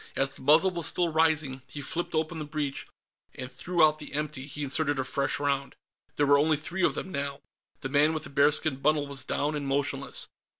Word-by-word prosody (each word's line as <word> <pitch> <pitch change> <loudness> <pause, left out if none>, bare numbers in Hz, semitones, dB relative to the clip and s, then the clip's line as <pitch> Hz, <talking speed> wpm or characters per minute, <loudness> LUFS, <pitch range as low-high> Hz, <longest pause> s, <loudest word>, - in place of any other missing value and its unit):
As 135 0 +1
the - - -16
muzzle 155 +7 +5
was 170 -3 -1
still 175 -2 +1
rising, 155 -4 +2
he 145 - -8
flipped 165 +4 -3
open 160 +1 -1
the 155 - -4
breech, 145 -2 -3 0.5
and 130 +1 -6
threw 170 +5 +3
out 155 0 +1
the 150 - -9
empty. 150 -2 -3
He 150 0 -5
inserted 145 +1 0
a 130 - 0
fresh 135 +2 -1
round. 140 -1 -1 0.4
There 145 - +2
were 140 0 +5
only 155 +1 +3
three 175 +5 -3
of - - +3
them, 190 - -5
now. 140 -2 -3 0.4
The 135 - -4
man 145 +3 +4
with 155 - -3
the - - -9
bearskin 145 0 +2
bundle 150 +1 +2
was 140 -3 -4
down 145 +3 -1
and 145 -2 -3
motionless. 140 0 0
145 Hz, 215 wpm, -28 LUFS, 140-155 Hz, 0.5 s, muzzle